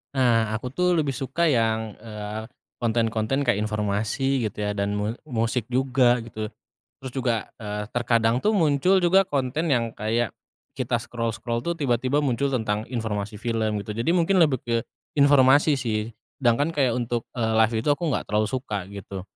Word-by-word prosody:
Nah, 115 -4 +2
aku 125 +3 -5
tuh 180 +3 +2
lebih 150 -4 +1
suka 135 +7 -1
yang, 110 -4 0
eee, 105 0 -6 0.3
konten-konten 115 +2 0
kayak 120 -5 +2
informasi 110 +5 0
gitu - - -11
ya, 105 - 0
dan 100 +1 0
mu 105 +1 -1 0.2
musik 115 -2 -1
juga 125 -1 +2
gitu. 110 -2 -5 0.5
Terus 130 -2 -7
juga, 120 -3 +1 0.2
eee, 105 -1 -5
terkadang 115 0 +2
tuh 215 - +3
muncul 175 0 +3
juga 185 +2 +4
konten 145 +1 -1
yang 115 -3 +1
kayak 110 +2 -1 0.4
kita 125 -2 -1
scroll-scroll 115 0 -3
tuh 170 0 -1
tiba-tiba 130 0 +1
muncul 135 +1 +1
tentang 110 -4 -1
informasi 110 -4 -3
film 110 -2 -1
gitu. 105 - -6
Jadi 115 +7 -1
mungkin 180 +2 +3
lebih 135 -6 +2
ke 115 -1 -1 0.4
informasi 140 +1 +5
sih, 110 -2 -2 0.3
sedangkan 135 +6 +2
kayak 130 -5 +2
untuk, 120 -1 -2
eee, 110 -1 +1
live 110 +1 +3
itu 130 - -1
aku 170 - -7
nggak - - -1
terlalu 105 0 +1
suka 105 -8 -3
gitu. 100 -1 -7
120 Hz, 165 wpm, -25 LUFS, 110-135 Hz, 0.5 s, informasi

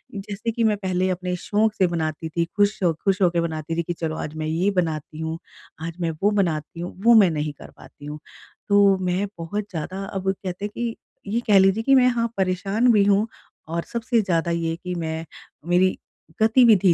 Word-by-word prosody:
जैसे 205 +3 -4
कि 230 +1 -1
मैं 215 -2 +3
पहले 185 -1 0
अपने 180 0 -2
शौक 215 +4 +1
से 185 - +3
बनाती 160 -1 -3
थी, 170 +1 0
खुश 205 +1 +2
हो 170 -2 +3
खुश 195 0 +2
हो 180 - +5
के 170 0 0
बनाती 160 -1 -3
थी 170 - +1
कि 175 - -3
चलो 160 -2 -3
आज 150 -1 -5
मैं 155 - -3
ये 165 +5 +1
बनाती 160 -4 -2
हूँ, 160 0 -3 0.4
आज 165 0 -4
मैं 165 -1 0
वो 205 - +4
बनाती 170 -5 -1
हूँ, 175 +1 -5
वो 235 - +8
मैं 195 -4 +6
नहीं 150 -1 -2
कर - - -12
पाती 145 - -14
हूँ। 150 +1 -6 0.5
तो 200 -1 +5
मैं 185 +2 0
बहुत 200 +5 -3
ज़्यादा 185 +3 -4
अब 190 0 0
कहते 185 +1 -5
हैं 210 - -5
कि 235 -1 -2 0.4
ये 230 - +1
कह 205 -2 +6
लीजिए 195 +3 +3
कि 270 +3 +5
मैं 255 -1 +6
हाँ 235 -1 0
परेशान 195 +6 +2
भी 205 -2 +5
हूँ 205 +2 +3 0.4
और 170 +1 -2
सबसे 235 0 +1
ज़्यादा 170 -3 0
ये 165 -1 -1
कि 180 -1 -3
मैं 160 -1 -3 0.4
मेरी 185 +1 +3 0.4
गतिविधि 220 -5 +6
185 Hz, 210 wpm, -23 LUFS, 165-205 Hz, 0.5 s, वो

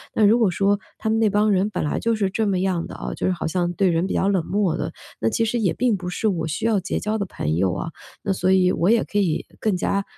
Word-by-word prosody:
那 215 - +4
如 220 +4 +5
果 220 -5 +4
说 200 +3 +1 0.2
他 220 - -5
们 220 0 +2
那 220 -2 +3
帮 210 +1 +2
人 195 +1 +2
本 - - -3
来 150 - -1
就 230 0 +1
是 200 -3 0
这 220 +1 0
么 195 -2 +1
样 185 -2 -1
的 - - -9
啊， - - -5
就 - - -2
是 185 - +2
好 175 - -3
像 175 +1 0
对 190 +1 +2
人 165 +2 +1
比 - - -3
较 195 - +1
冷 190 -4 +2
漠 195 -4 +1
的， - - -3 0.3
那 115 - +1
其 225 - 0
实 235 +2 -1
也 200 -6 +2
并 245 -3 +1
不 180 -2 -5
是 200 +5 -1
我 170 -6 -1
需 155 +7 -3
要 220 -3 +3
结 190 +2 -3
交 215 +1 -2
的 200 - -1
朋 75 - -2
友 90 0 +1
啊， 165 - -4 0.3
那 195 - 0
所 185 0 +1
以 185 -1 +4
我 175 +1 +1
也 230 0 +4
可 205 - -4
以 180 -6 0
更 215 -3 +1
加， 200 +2 0
195 Hz, 320 characters per minute, -22 LUFS, 180-215 Hz, 0.3 s, 如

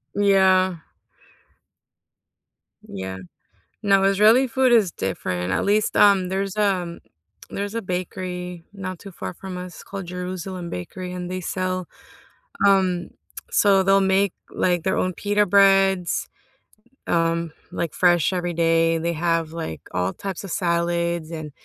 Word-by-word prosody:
Yeah. 190 -2 +4 2.1
Yeah. 95 -1 -6 0.7
No, 195 -1 +4
Israeli 215 +7 +5
food 255 +1 +2
is 210 -7 +4
different, 90 -1 -3
at - - 0
least, 210 +1 +1
um 195 -3 +5
there's, 195 +1 -2
um 185 -5 0 0.5
there's 200 +1 -4
a 230 - -2
bakery 180 -1 -5
not 185 -3 -6
too 200 - -10
far 180 - -7
from 185 0 -7
us 180 -1 -8
called 195 -3 -7
Jerusalem 180 0 -5
Bakery 180 - -6
and 180 0 -5
they 185 0 -3
sell, 185 0 -2 0.8
um 185 -3 +2 0.4
so 195 -2 +4
they'll 195 +1 +4
make, 190 0 +2 0.2
like, 175 -2 0
their 190 - 0
own 185 - 0
pita 205 +2 +1
breads, 195 -2 +3 0.8
um, 165 -1 0 0.2
like, 170 - -3
fresh 175 -1 +3
every 175 -1 -2
day, 165 0 +2
they 170 +1 -1
have, 165 -1 0
like, 120 - -5
all 90 +1 -1
types 195 - -6
of 195 - -7
salads 170 -2 0
and, 155 -2 -6
185 Hz, 135 wpm, -23 LUFS, 170-195 Hz, 2.1 s, Israeli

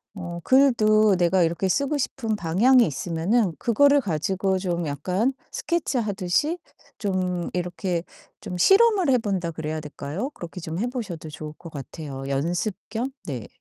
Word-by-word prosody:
어 175 -2 -6
글도 215 -6 +5
내가 180 0 +3
이렇게 170 +3 0
쓰고 280 +7 +1
싶은 235 -5 -2
방향이 215 +9 +4
있으면은 170 - 0
그거를 280 +5 +4
가지고 190 - 0
좀 175 -3 -2
약간 180 - 0 0.2
스케치 340 -6 -1
하듯이 210 - 0 0.4
좀 185 -3 -1
이렇게 175 -1 -2 0.4
좀 180 - -5
실험을 390 - +5
해 255 - +5
본다 190 -6 -2
그래야 155 0 -4
될까요? 150 - -5
그렇게 175 +1 -8
좀 165 +1 -5
해 240 - 0
보셔도 195 -11 -5
좋을 155 0 -7
것 165 -2 -11
같아요. 140 -1 -7
연습 170 +9 -1
겸? 235 +4 -2 0.2
네. 125 -8 -5
185 Hz, 305 characters per minute, -24 LUFS, 165-235 Hz, 0.4 s, 글도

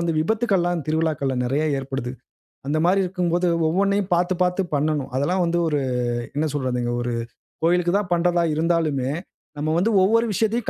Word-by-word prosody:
வந்து 170 -1 0
விபத்துக்கள்லாம் 175 - 0
திருவிழாக்கள்ல 155 -4 0
நெறைய 140 +5 0
ஏற்படுது. 135 -2 -4 0.6
அந்த 150 +2 0
மாரி 185 +3 +3
இருக்கும்போது, 180 -1 0 0.2
ஒவ்வொன்னையும் 200 +3 +1
பாத்து, 175 +2 +1
பாத்து 180 +2 +1
பண்ணணும். 150 -1 0
அதெல்லாம் 180 +7 +1
வந்து 170 +1 0
ஒரு 150 -2 +1 0.6
என்ன 155 +2 +1
சொல்றதுங்க, 125 -3 -1
ஒரு 120 0 -2 0.5
கோயிலுக்கு 175 +1 +2
தான் 190 -4 -5
பண்றதா 175 0 +2
இருந்தாலுமே, 155 -5 0 0.5
நம்ம 155 +1 0
வந்து 215 +6 +2
ஒவ்வொரு 230 +4 +3
விஷயத்தையும், 220 +3 0
170 Hz, 145 wpm, -23 LUFS, 145-180 Hz, 0.6 s, மாரி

